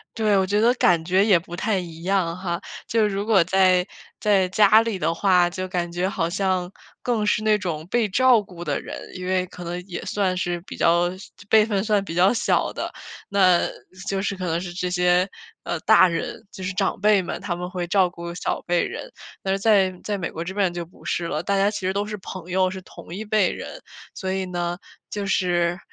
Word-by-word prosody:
对， 215 -3 +2
我 190 - +3
觉 205 +2 +1
得 235 +3 +4
感 175 -9 +3
觉 185 +3 +3
也 195 -5 +5
不 170 +1 -9
太 205 +2 0
一 165 -2 -8
样 180 -2 0
哈。 175 -2 -3 0.3
就 220 -2 +2
如 200 0 -2
果 215 -4 +5
在， 185 -1 +4 0.3
在 200 -3 +3
家 210 +3 +6
里 225 -5 -2
的 165 +1 +1
话， 180 -1 +3
就 185 +1 -4
感 175 -1 -2
觉 175 +2 -1
好 165 -3 -1
像 185 -1 0 0.3
更 230 -4 0
是 210 - +2
那 215 -1 +4
种 165 -4 -4
被 225 0 +1
照 250 +2 +5
顾 180 -4 -12
的 150 -4 -2
人， - - -7 0.2
因 185 -1 -6
为 185 0 +1
可 180 - -10
能 175 +1 -4
也 175 - -5
算 190 -3 0
是 175 -1 -2
比 - - -7
较 170 +1 +3
小 190 - -12 0.2
辈 220 -1 +6
分 205 -3 0
算 210 -2 +1
比 180 - -6
较 180 +6 +4
小 225 - +1
的， - - -4 0.4
那， 185 -3 +4
是 - - -2 0.4
就 195 -1 -1
是 195 0 -2
可 185 -1 -5
能 165 0 0
是 175 -1 -6
这 180 0 -3
些， 180 0 +3 0.4
呃， 170 - -3
大 205 -4 +6
人， 165 - -4
就 190 - -10
是 185 0 -3
长 195 0 0
辈 205 -1 +4
们， 175 - -5
他 175 -4 -3
们 180 +1 -5
会 180 -2 -4
照 185 -1 +3
顾 170 0 -8
小 - - -2
辈 175 -1 +1
人。 - - -6 0.3
但 190 - 0
是 195 - 0
在， 195 -2 +3
在 205 -1 -2
美 175 - -3
国 165 - -5
这 185 - -6
边 190 -3 +1
就 175 -1 -4
不 170 - -19
是 170 - -1
了， 155 -2 -2
大 200 +3 0
家 200 +1 +3
其 - - -4
实 190 - 0
都 200 +1 -1
是 210 0 -5
朋 185 -2 -9
友， 185 0 +2
是 190 0 -7
同 175 - -11
一 215 - -5
辈 210 -3 +2
人。 - - -7 0.3
所 190 -1 -3
以 190 0 -1
呢， 175 -1 -3 0.3
就 205 -1 -4
是， 175 -2 +1
185 Hz, 250 characters per minute, -23 LUFS, 175-200 Hz, 0.4 s, 家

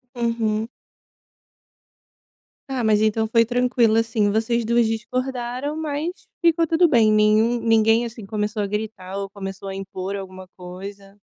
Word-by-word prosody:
Uhum. 225 -2 -1 2.0
Ah, 265 -2 -2
mas 215 -2 +3
então 220 +1 +1
foi 230 +1 +4
tranquilo, 245 -2 +2
assim, 225 -2 +1
vocês 230 +2 0
2 235 +1 +2
discordaram, 250 +4 -3
mas 310 +1 -2 0.3
ficou 335 -1 +3
tudo 330 +2 +3
bem, 230 -8 +4
nenhum 215 +3 +3
ninguém 225 0 +3
assim 230 -2 -8
começou 210 0 -2
a - - -2
gritar 205 -2 -5
ou 200 0 -4
começou 195 -1 -7
a 195 - -5
impor 195 0 -5
alguma 185 -1 -8
coisa? 195 +2 -10
220 Hz, 140 wpm, -22 LUFS, 205-240 Hz, 2.0 s, foi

